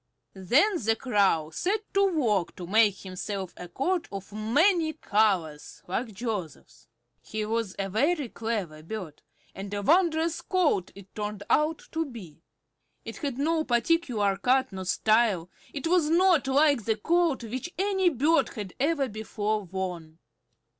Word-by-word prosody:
Then 270 Hz, -, +2 dB
the 225 Hz, +1 st, +2 dB
Crow 200 Hz, -, +1 dB
set 395 Hz, -, 0 dB
to 395 Hz, 0 st, +4 dB
work 220 Hz, -, 0 dB
to 180 Hz, -, -7 dB
make 210 Hz, +2 st, +4 dB
himself 190 Hz, 0 st, -5 dB
a 180 Hz, -, -8 dB
coat 345 Hz, -, -1 dB
of 195 Hz, 0 st, -8 dB
many 315 Hz, -, +2 dB
colors, 195 Hz, -, 0 dB
like 225 Hz, +6 st, -2 dB
Joseph's. 205 Hz, -, -6 dB, 0.3 s
He 215 Hz, 0 st, -4 dB
was 225 Hz, -2 st, -2 dB
a 195 Hz, -, -2 dB
very 285 Hz, -, +1 dB
clever 210 Hz, -10 st, -4 dB
bird, 170 Hz, -3 st, -7 dB, 0.3 s
and 195 Hz, +1 st, -7 dB
a 205 Hz, -, -3 dB
wondrous 330 Hz, -, +2 dB
coat 315 Hz, -, +1 dB
it 200 Hz, -1 st, -14 dB
turned 210 Hz, -1 st, -5 dB
out 305 Hz, +1 st, +2 dB
to 325 Hz, 0 st, 0 dB
be. 205 Hz, -, -11 dB, 0.6 s
It -, -, -7 dB
had 280 Hz, -5 st, -4 dB
no 315 Hz, +3 st, +1 dB
particular 240 Hz, -, +1 dB
cut 255 Hz, +5 st, +2 dB
nor 190 Hz, -1 st, -6 dB
style; 210 Hz, -3 st, +2 dB, 0.2 s
it 280 Hz, -, -5 dB
was 330 Hz, -2 st, +3 dB
not 340 Hz, -4 st, +4 dB
like 280 Hz, -4 st, +3 dB
the 220 Hz, -1 st, +1 dB
coat 330 Hz, +1 st, +1 dB
which 255 Hz, +9 st, -5 dB
any 385 Hz, -1 st, +2 dB
bird 310 Hz, +3 st, +2 dB
had 205 Hz, -5 st, -6 dB
ever 285 Hz, 0 st, +1 dB
before 215 Hz, -1 st, -2 dB
worn. 175 Hz, -3 st, -5 dB
225 Hz, 145 wpm, -27 LUFS, 195-310 Hz, 0.6 s, to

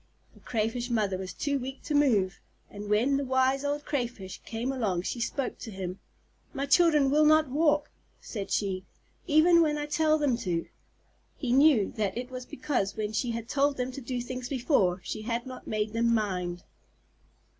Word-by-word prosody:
The -, -, -19 dB
Crayfish 230 Hz, +2 st, -2 dB
Mother 210 Hz, -5 st, +1 dB
was 185 Hz, 0 st, -5 dB
too 280 Hz, -2 st, -1 dB
weak 265 Hz, +2 st, -7 dB
to 305 Hz, -, -3 dB
move, 220 Hz, -11 st, +3 dB, 0.3 s
and 205 Hz, 0 st, -7 dB
when 240 Hz, +7 st, +3 dB
the 280 Hz, -, -1 dB
Wise 260 Hz, +1 st, +2 dB
Old 290 Hz, +1 st, -2 dB
Crayfish 240 Hz, -9 st, -4 dB
came 235 Hz, +3 st, -3 dB
along 205 Hz, -9 st, -1 dB
she 240 Hz, -, -3 dB
spoke 250 Hz, +3 st, -2 dB
to 230 Hz, -, -7 dB
him. 190 Hz, -2 st, -5 dB, 0.6 s
"My 275 Hz, -, -1 dB
children 300 Hz, -2 st, +4 dB
will 305 Hz, +2 st, +4 dB
not 310 Hz, -2 st, +4 dB
walk," 295 Hz, 0 st, +2 dB, 0.3 s
said 205 Hz, -4 st, -6 dB
she, 190 Hz, -2 st, -1 dB, 0.4 s
"even 335 Hz, +2 st, +6 dB
when 300 Hz, -2 st, +2 dB
I 295 Hz, -, -2 dB
tell 310 Hz, +1 st, +2 dB
them 285 Hz, -6 st, +1 dB
to." 175 Hz, -7 st, -2 dB, 0.7 s
He 250 Hz, -4 st, -1 dB
knew 270 Hz, -7 st, +5 dB
that 205 Hz, -1 st, -1 dB
it 250 Hz, +1 st, -5 dB
was 255 Hz, -1 st, -7 dB
because 255 Hz, -8 st, -2 dB
when 215 Hz, 0 st, -2 dB
she 245 Hz, +3 st, 0 dB
had 230 Hz, -1 st, -4 dB
told 280 Hz, +1 st, +1 dB
them 250 Hz, 0 st, -2 dB
to 275 Hz, -, -7 dB
do 245 Hz, 0 st, -3 dB
things 250 Hz, 0 st, -5 dB
before, 235 Hz, -, +1 dB
she 215 Hz, -, -5 dB
had 235 Hz, +2 st, -2 dB
not 255 Hz, -1 st, -9 dB
made 215 Hz, 0 st, -1 dB
them 235 Hz, +1 st, +2 dB
mind. 180 Hz, -6 st, -1 dB
250 Hz, 185 wpm, -28 LUFS, 210-280 Hz, 0.7 s, even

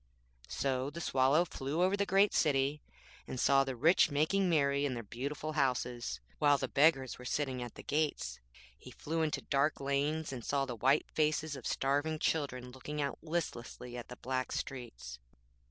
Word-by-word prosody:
So 130 Hz, -, -1 dB
the 160 Hz, +4 st, -7 dB
Swallow 140 Hz, +2 st, +3 dB
flew 150 Hz, +2 st, -2 dB
over 190 Hz, +2 st, +3 dB
the 200 Hz, 0 st, 0 dB
great 195 Hz, +2 st, +4 dB
city, 140 Hz, 0 st, +2 dB, 0.5 s
and 130 Hz, -, -5 dB
saw 135 Hz, +1 st, +5 dB
the 135 Hz, -1 st, -4 dB
rich 160 Hz, +8 st, +5 dB
making 160 Hz, +6 st, +2 dB
merry 140 Hz, -3 st, +2 dB
in 135 Hz, -3 st, 0 dB
their 115 Hz, -, -5 dB
beautiful 140 Hz, +8 st, -4 dB
houses, 125 Hz, -, -1 dB, 0.2 s
while 145 Hz, -1 st, +5 dB
the -, -, -2 dB
beggars 135 Hz, -4 st, +3 dB
were -, -, -9 dB
sitting 130 Hz, -1 st, -1 dB
at 120 Hz, -1 st, -7 dB
the -, -, -10 dB
gates. 145 Hz, -, -1 dB, 0.4 s
He -, -, -13 dB
flew 160 Hz, +2 st, -3 dB
into 155 Hz, -1 st, -1 dB
dark 140 Hz, +2 st, +1 dB
lanes, 140 Hz, +2 st, -1 dB
and 120 Hz, -3 st, -6 dB
saw 140 Hz, +2 st, 0 dB
the 125 Hz, -3 st, -5 dB
white 135 Hz, +6 st, +3 dB
faces 155 Hz, -1 st, 0 dB
of 130 Hz, -, -6 dB
starving 145 Hz, +4 st, 0 dB
children 130 Hz, -6 st, -1 dB
looking 145 Hz, +4 st, -6 dB
out 140 Hz, -1 st, -2 dB
listlessly 125 Hz, -7 st, -4 dB
at 120 Hz, -, -7 dB
the 125 Hz, -, -8 dB
black 130 Hz, 0 st, -2 dB
streets. 120 Hz, -, -6 dB
140 Hz, 175 wpm, -33 LUFS, 130-155 Hz, 0.5 s, saw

